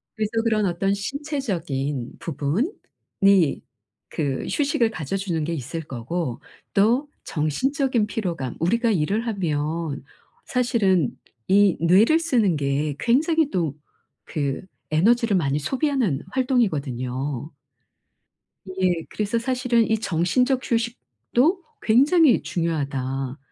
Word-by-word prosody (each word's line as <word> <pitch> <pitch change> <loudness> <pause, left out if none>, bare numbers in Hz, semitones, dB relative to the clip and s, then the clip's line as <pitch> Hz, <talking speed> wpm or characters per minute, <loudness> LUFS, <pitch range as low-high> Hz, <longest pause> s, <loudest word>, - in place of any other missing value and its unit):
그래서 215 -1 -2
그런 215 -2 +2
어떤 195 +2 0
신체적인 195 - -3
부분이 185 - 0 0.5
그 140 -4 -2
휴식을 275 -6 +1
가져 155 -1 -4
주는 175 -5 -2
게 170 - -2
있을 160 +2 -4
거고 130 +1 -4 0.3
또 235 +8 +3 0.2
정신적인 245 - 0
피로감 170 - -3
우리가 230 +7 +2
일을 200 +6 0
하면 160 -6 -2 0.4
사실은 210 - +2 0.4
이 200 -1 +4
뇌를 215 - +5
쓰는 235 - +2
게 145 +1 -1
굉장히 305 +5 +2
또 165 -6 -1 0.5
그 140 -3 -2 0.3
에너지를 225 +6 +3
많이 145 -4 +1
소비하는 255 - 0
활동이거든요. 145 - -1 1.1
이게 185 -3 -1
그래서 210 +2 -1
사실은 250 -2 +1
이 220 - +3
정신적 250 - +1
휴식도 245 - 0 0.2
굉장히 280 +4 +5
중요하다. 135 -5 -2
195 Hz, 240 characters per minute, -23 LUFS, 150-240 Hz, 1.1 s, 뇌를